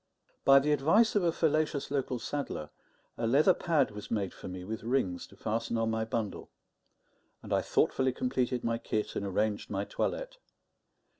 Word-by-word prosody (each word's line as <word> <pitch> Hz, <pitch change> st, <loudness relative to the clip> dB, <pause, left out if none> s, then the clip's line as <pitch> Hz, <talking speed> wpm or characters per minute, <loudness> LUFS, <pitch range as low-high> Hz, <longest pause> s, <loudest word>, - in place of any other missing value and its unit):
By 135 Hz, 0 st, +8 dB
the 145 Hz, +2 st, +3 dB
advice 165 Hz, -, +4 dB
of 205 Hz, -, +4 dB
a 170 Hz, -, +3 dB
fallacious 155 Hz, -3 st, 0 dB
local 135 Hz, -3 st, -1 dB
saddler, 120 Hz, -, -4 dB, 0.5 s
a 115 Hz, -, 0 dB
leather 150 Hz, +10 st, +5 dB
pad 155 Hz, -10 st, +1 dB
was 105 Hz, -1 st, -8 dB
made 100 Hz, -4 st, -1 dB
for -, -, -9 dB
me 90 Hz, 0 st, -6 dB
with 110 Hz, +3 st, -5 dB
rings 110 Hz, -7 st, -1 dB
to -, -, -17 dB
fasten 115 Hz, +3 st, -2 dB
on 115 Hz, 0 st, +1 dB
my 110 Hz, 0 st, -1 dB
bundle; 110 Hz, -2 st, -3 dB, 0.9 s
and -, -, -4 dB
I -, -, +3 dB
thoughtfully 130 Hz, 0 st, +2 dB
completed 125 Hz, 0 st, -1 dB
my 115 Hz, 0 st, 0 dB
kit 105 Hz, -2 st, -2 dB
and -, -, -2 dB
arranged 105 Hz, +2 st, -1 dB
my 100 Hz, 0 st, -2 dB
toilette. -, -, -3 dB
120 Hz, 170 wpm, -30 LUFS, 105-145 Hz, 0.9 s, By